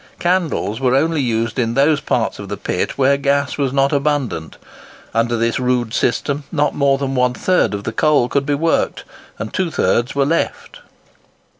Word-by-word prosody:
Candles 175 - 0
were 130 -1 +2
only 160 +2 +1
used 115 -1 -1
in 115 -1 0
those 145 +2 +3
parts - - -1
of - - -8
the - - -4
pit - - -3
where 140 +1 +3
gas 140 +1 0
was 135 -2 +1
not 135 +1 +2
abundant. 140 - -1 0.6
Under 115 +1 +1
this 115 +1 0
rude 125 -2 0
system 140 +5 0
not 150 -3 +1
more 140 -1 +2
than 135 -1 -3
one 125 -1 +1
third 180 - +1
of 100 - -6
the 115 - -3
coal 150 -4 +3
could 140 +2 -1
be 145 - +2
worked; 165 +3 0 0.3
and 110 - -6
two 185 -2 0
thirds 120 -5 0
were 140 -1 +2
left. 165 +4 -2
140 Hz, 180 wpm, -18 LUFS, 120-145 Hz, 0.6 s, those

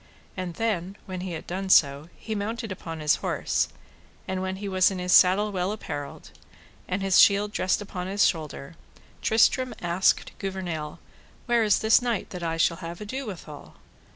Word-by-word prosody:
And 180 -2 -5
then 200 -4 -2
when 185 -2 -6
he 185 -1 -5
had 160 - -6 0.3
so 140 -4 +5
done 160 - -16
he 220 - -5
mounted 220 +2 -3
upon 165 -3 -6
his 150 0 +3
horse; - - -1 0.6
and 190 -1 -2
when 190 0 -3
he 200 +1 -6
was 185 -1 +3
in 190 - -5
his 180 0 0
saddle 195 +3 +5
well 185 0 -1
apparelled, 145 -9 -7 0.6
and 185 +2 -2
his 195 -1 +4
shield 205 +1 +5
dressed 190 +1 0
upon 185 -3 -6
his 200 +2 +2
shoulder, 155 -2 -3 0.5
Tristram 245 +3 +3
asked 175 +2 +1
Gouvernail, 180 -6 -4 0.5
Where 240 -2 +3
is 210 -2 +4
this 220 +2 +4
knight 240 -5 -2
that 180 - -6
I 165 -1 -2
shall 165 +1 +2
have 170 -1 -7
ado 260 +5 -5
withal? 160 -7 -9
185 Hz, 175 wpm, -26 LUFS, 170-205 Hz, 0.6 s, so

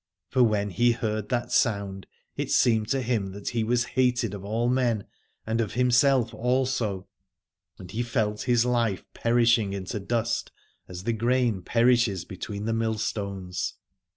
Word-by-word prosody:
For 130 - +2
when 105 -3 +2
he 120 +5 +3
heard 110 -2 -3
that 120 -1 -1
sound 100 - 0 0.3
it - - -3
seemed 110 -3 +3
to 135 -1 0
him 110 -6 -1
that 100 0 -5
he 115 -1 -1
was 120 +2 +1
hated 125 -4 +1
of 100 -2 -7
all 110 +4 -1
men 120 -5 +1 0.4
and 115 +1 0
of 110 - -3
himself 125 -1 +3
also, 120 -5 -1 0.7
and 90 -1 -10
he 115 - -2
felt 110 -3 -1
his 120 -1 +2
life 120 -5 0
perishing 115 -3 +2
into 100 +1 -4
dust 115 +3 -1 0.4
as 90 0 -8
the 115 - 0
grain 120 -2 +1
perishes 115 -3 +2
between 100 +3 -6
the 115 - 0
mill 115 0 0
141 105 -2 -3
Aladore 95 -1 -7
stones. 90 -1 -3
115 Hz, 165 wpm, -26 LUFS, 100-120 Hz, 0.7 s, he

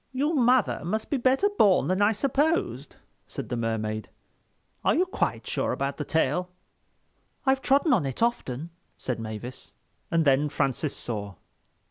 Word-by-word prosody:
"Your 285 +5 0
mother 250 - +3
must 215 +7 -3
be 285 - +2
better 260 +9 +3
born 195 -4 +5
than 185 +2 +1
I 205 +1 +5
supposed," 265 - 0 0.3
said - - -7
the 125 - -1
Mermaid. 110 -2 -2 0.7
"Are - - +3
you 360 - +3
quite 375 - -2
sure - - -1
about 140 0 -2
the 150 - -2
tail?" 160 +4 0 1.0
"I've 265 0 +3
trodden 285 +3 +3
on 175 - +2
it 135 - -2
often," 165 - -1 0.3
said 125 -3 -3
Mavis—and 120 +8 -5
then 140 +2 +3
Francis 140 +1 -1
saw. 100 -4 -5
165 Hz, 145 wpm, -26 LUFS, -, 1.0 s, born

